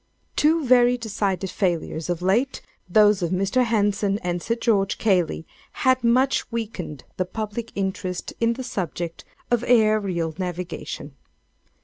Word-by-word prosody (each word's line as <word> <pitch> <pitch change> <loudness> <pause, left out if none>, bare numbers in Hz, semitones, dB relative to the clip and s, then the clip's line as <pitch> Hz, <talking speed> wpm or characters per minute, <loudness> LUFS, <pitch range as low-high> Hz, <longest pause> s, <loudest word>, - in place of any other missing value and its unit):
"Two 310 0 +3
very 245 0 +5
decided 200 -5 -2
failures, 170 -3 -1
of 175 0 -2
late—those 210 -2 +2
of 170 - 0
Mr. 195 +7 +1
Henson 205 -3 +1
and 175 -1 -1
Sir 230 - -1
George 210 -5 +1
Cayley—had 210 - 0
much 255 +3 +2
weakened 205 - -5
the 185 - 0
public 215 +4 -5
interest 190 -2 -3
in 230 0 +2
the 260 +2 -6
subject 175 - -4 0.3
of 240 -1 +2
aerial 210 -8 +2
navigation. 180 -5 -5
205 Hz, 120 wpm, -24 LUFS, 180-235 Hz, 0.3 s, very